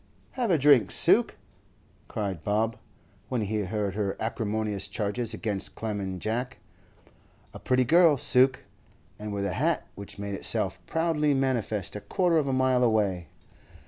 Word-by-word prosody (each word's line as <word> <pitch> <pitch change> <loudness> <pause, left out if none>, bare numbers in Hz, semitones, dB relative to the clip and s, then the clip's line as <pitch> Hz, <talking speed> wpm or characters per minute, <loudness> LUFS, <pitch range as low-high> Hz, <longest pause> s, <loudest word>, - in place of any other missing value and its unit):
'Have 245 -4 -2
a 170 - +4
drink, 135 -7 +5
Suke!' - - +4 0.7
cried 100 -6 -4
Bob, 110 +2 0 0.5
when 125 -3 -1
he 105 +1 -2
heard 100 0 -2
her 100 -1 -2
acrimonious 110 -2 -2
charges 105 +3 -2
against 105 -3 -3
Clem 110 -2 -4
and 95 -2 -5
Jack. 125 +7 -3 1.0
A - - -9
pretty 130 0 +1
girl, 165 +1 +5
Suke, 130 +1 +3 0.6
and 105 0 -6
with 100 -1 -2
a 95 - -2
hat - - 0
which 100 +1 -9
made 100 0 -5
itself 100 - -1
proudly 160 -3 +1
manifest 120 -8 -1
a 105 - -5
quarter 175 - +1
of 150 -3 +1
a - - 0
mile 130 -1 +2
away. 100 -7 +1
110 Hz, 150 wpm, -27 LUFS, 100-130 Hz, 1.0 s, drink